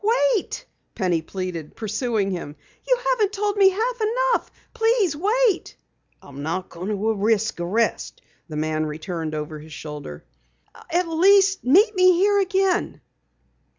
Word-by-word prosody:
"Wait!" 400 - -4 0.3
Penny 180 -5 0
pleaded, 175 -2 -6
pursuing 220 -2 -1
him. 165 -5 -5 0.3
"You - - +3
haven't 430 -5 +1
told 410 0 -1
me 395 -2 +6
half 455 +5 -2
enough. 485 +3 +1 0.2
Please 450 -7 +2
wait!" 420 +4 +1 0.5
"I'm 140 0 -10
not 170 +5 -3
going 175 +3 -7
to 215 +1 0
risk 220 0 0
arrest," 200 +7 -1 0.3
the 155 - -5
man 155 0 -1
returned 155 +1 -5
over 150 0 -5
his 155 +1 -12
shoulder. 150 - -8 0.7
"At 350 +1 +1
least 385 +4 +4
meet 395 - +5
me 370 0 +6
here 400 +3 +3
again!" 385 -1 0
235 Hz, 135 wpm, -23 LUFS, -, 0.7 s, me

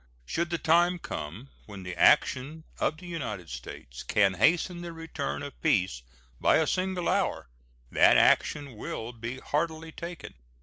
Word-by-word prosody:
Should 170 - -1
the 170 - -1
time 175 +3 +3
come 100 - -7 0.2
when 100 -3 -9
the 90 -1 -6
action 140 - +3 0.2
of 155 - 0
the 180 - -12
United 115 - -5
States - - -8
can 100 -2 +3
hasten 170 - +2
the 170 -1 -6
return 165 -4 -4
of 145 - -9
peace 95 - +1 0.4
by - - +4
a 160 - +3
single 185 +1 -1
hour, - - 0 0.4
that - - +6
action 140 -6 +3
will 115 +2 -5
be 115 +2 -6
heartily 160 +3 -2
taken. 170 +1 -8
145 Hz, 155 wpm, -28 LUFS, 105-170 Hz, 0.4 s, that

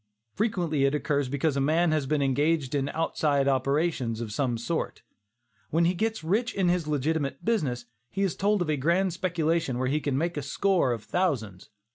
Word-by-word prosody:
Frequently 175 -10 0
it 140 +2 +2
occurs 145 -2 0
because 140 +2 0
a 140 - +1
man 160 +4 +2
has 155 -3 0
been 150 0 +1
engaged 145 +1 +1
in 140 -1 0
"outside 145 -3 0
operations," 135 -3 0
of 115 -3 -5
some 125 -2 0
sort. 160 +8 -3 0.7
When 165 +2 +2
he 175 - +3
gets 220 +1 -2
rich 220 +9 0
in 190 -3 +2
his 175 -3 0
legitimate 145 -1 -1
business, 140 - 0 0.2
he 195 - -2
is 190 - 0
told 205 -1 +2
of 160 - -5
a 150 - 0
grand 170 +6 +1
speculation 165 -6 0
where 130 0 0
he 150 +3 +1
can 140 -3 -1
make 170 +2 -1
a - - -1
score 175 +1 +1
of 115 -3 -3
thousands. 115 - -2
150 Hz, 190 wpm, -27 LUFS, 135-175 Hz, 0.7 s, he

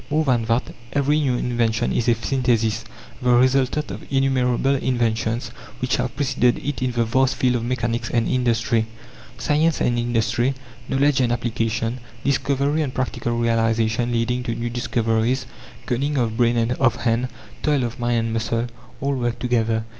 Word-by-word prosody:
More 155 +1 +1
than 120 -4 +2
that: 115 +2 0 0.2
every 145 +2 +2
new 135 -4 +1
invention 120 -2 0
is 120 - +1
a 115 - +4
synthesis, 115 -2 0 0.4
the 125 - +1
resultant 130 +4 +2
of - - -9
innumerable 135 -1 +2
inventions 120 -3 0 0.3
which - - 0
have - - -2
preceded 125 -3 +2
it 145 -4 -2
in 130 -1 0
the 120 0 +2
vast 130 +3 +2
field 125 -1 +2
of 115 - -4
mechanics 120 -1 -1
and 115 -2 +1
industry. 115 -3 +1 0.5
Science 155 +2 +1
and 120 -1 +1
industry, 120 +2 +1 0.3
knowledge 140 0 +3
and 120 -2 +2
application, 115 0 -1 0.2
discovery 140 +2 +1
and 140 -4 -3
practical 120 -2 -2
realization 115 0 +1
leading 120 +1 0
to 115 -2 -3
new 120 +1 -3
discoveries, 120 +1 0 0.4
cunning 140 +4 -1
of 115 -3 0
brain 120 0 +2
and 115 +1 +1
of 130 -3 +3
hand, 120 +1 +1 0.3
toil 145 -4 +2
of 120 +1 -4
mind 120 0 +1
and 115 - -2
muscle 115 +1 -1 0.4
all 140 +1 0
work 120 -3 -1
together. 115 -2 0
120 Hz, 160 wpm, -22 LUFS, 115-130 Hz, 0.5 s, a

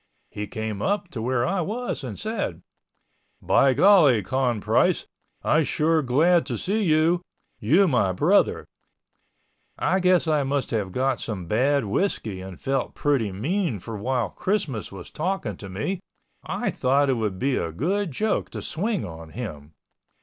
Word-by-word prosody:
He 105 0 -5
came 110 -1 -4
up 200 - -1
to 120 -10 -5
where 120 +1 0
I 190 +5 0
was 220 - -3
and 120 -6 -6
said, 200 - -3 0.8
"By 135 -2 +3
golly 150 - +6
Con 125 +1 0
Price - - +2 0.4
I 155 - +3
sure 155 +1 +2
glad 160 +7 +3
to - - -2
see 210 +4 -1
you, 165 -1 +3 0.4
you 160 - +4
my 125 - +2
brother." 165 - +2 1.1
I 190 - +1
guess 180 -2 +3
I 155 -2 +2
must 140 0 -1
have 105 -5 -1
got 130 +3 0
some 100 -6 -4
bad 130 +7 +2
whiskey 105 - -1
and 95 -1 -9
felt 135 -2 -2
pretty 135 -8 +1
mean 145 - -1
for 115 +5 -7
while 125 +3 -1
Christmas 160 - -2
was 95 -3 -10
talking 190 +5 -2
to 100 - -9
me 110 - -3 0.4
I - - -2
thought 135 +2 +2
it - - +3
would 110 -6 -2
be 135 +5 0
a 85 - -2
good 185 - -1
joke 215 +11 -1
to - - -6
swing 205 +5 -2
on 80 -1 -9
him. 80 -8 -7
135 Hz, 160 wpm, -24 LUFS, 105-175 Hz, 1.1 s, golly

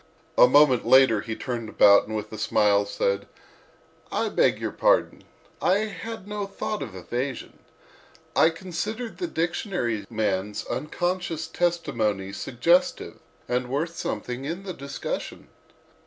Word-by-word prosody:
A - - +8
moment 135 -2 +5
later 130 -5 +5
he 110 0 -5
turned 120 -3 -4
about 100 -1 +6
and 110 - -4
with 105 0 -5
a - - -5
smile 105 -1 +3
said: 100 0 -1 0.8
"I - - 0
beg - - +2
your - - -3
pardon; - - +2 0.4
I 195 +3 +3
had 220 -1 -7
no 205 -1 -3
thought 205 +2 -4
of 110 -8 -6
evasion. 125 +8 -5 0.8
I 160 - +6
considered 200 +7 -5
the 355 - -1
dictionary 165 - -2
man's 105 -2 -2
unconscious 175 +1 -2
testimony 110 - -1
suggestive 170 - +1 0.3
and 125 0 -1
worth 160 +5 -2
something 125 -4 -4
in 170 +7 -4
the 190 -2 -5
discussion. 140 -2 -6
135 Hz, 130 wpm, -25 LUFS, 110-175 Hz, 0.8 s, A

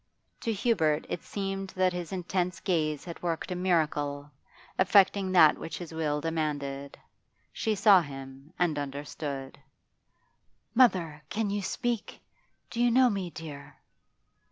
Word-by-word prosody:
To 230 - -1
Hubert 190 -9 +1
it - - -3
seemed 195 -1 -4
that 185 -1 +2
his 175 -1 -5
intense 180 0 -2
gaze 155 -5 0
had 170 -2 -8
worked 170 +1 -2
a - - -1
miracle, 150 -5 0 0.5
effecting 190 0 +4
that 160 -4 +7
which 165 - -5
his 170 -2 -8
will 150 -2 0
demanded. 145 -3 -3 0.6
She 220 -1 0
saw 200 -2 +7
him 135 0 -9
and 165 -4 +1
understood. 140 -1 -5 1.1
'Mother, 185 - +3
can 215 -1 -1
you 205 0 -1
speak? 235 +2 -3 0.5
Do 235 - -2
you 240 - +5
know 250 +1 +5
me, 195 -3 -3
dear? 155 -4 -9
170 Hz, 130 wpm, -29 LUFS, 150-195 Hz, 1.1 s, that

